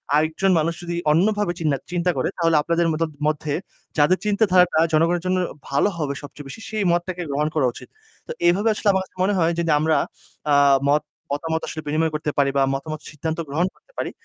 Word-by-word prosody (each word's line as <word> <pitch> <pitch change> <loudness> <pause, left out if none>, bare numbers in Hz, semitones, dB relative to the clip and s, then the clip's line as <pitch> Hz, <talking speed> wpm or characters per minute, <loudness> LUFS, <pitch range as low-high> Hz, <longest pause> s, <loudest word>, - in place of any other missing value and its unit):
আরেকজন 160 +5 +2
মানুষ 165 +2 0
যদি 170 0 -3 0.2
অন্যভাবে 205 +4 +2
চিন্না 150 -4 +1
চিন্তা 180 0 +1
করে - - 0
তাহলে 165 -2 +2
আপনাদের 170 +2 +1
মদত 160 0 -1 0.2
মধ্যে 150 -1 -1 0.4
যাদের 155 +5 +4
চিন্তাধারাটা 185 -5 +3
জনগণের 165 +2 +2
জন্য 185 0 +1 0.3
ভালো 140 +9 +2
হবে 145 -3 -1
সবচেয়ে 145 0 -10
বেশি, 135 - -9
সেই 215 -1 -1
মতটাকে 175 +1 -1
গ্রহণ 145 +2 0
করা 150 -4 +3
উচিত। - - -12 0.4
তো - - -5 0.2
এইভাবে 200 +6 +3
আসলে 215 - -4
আমার 190 -1 +1
কাছে 185 - -29
মনে 200 +2 +2
হয় 165 0 +3
যদি 165 -2 +1
আমরা 160 +1 +2 0.5
আ - - +5 0.4
মত 150 +1 +3 0.3
মতামত 160 +2 -1
আসলে 155 - -5
বিনিময় 160 +2 +1
করতে 150 0 -2
পারি 140 -1 +3
বা 135 - +4
মতামত 155 +3 -4
সিদ্ধান্ত 160 +2 -4
গ্রহণ 170 +6 +1
করতে - - -29
পারি - - -2
165 Hz, 195 wpm, -22 LUFS, 150-180 Hz, 0.5 s, আ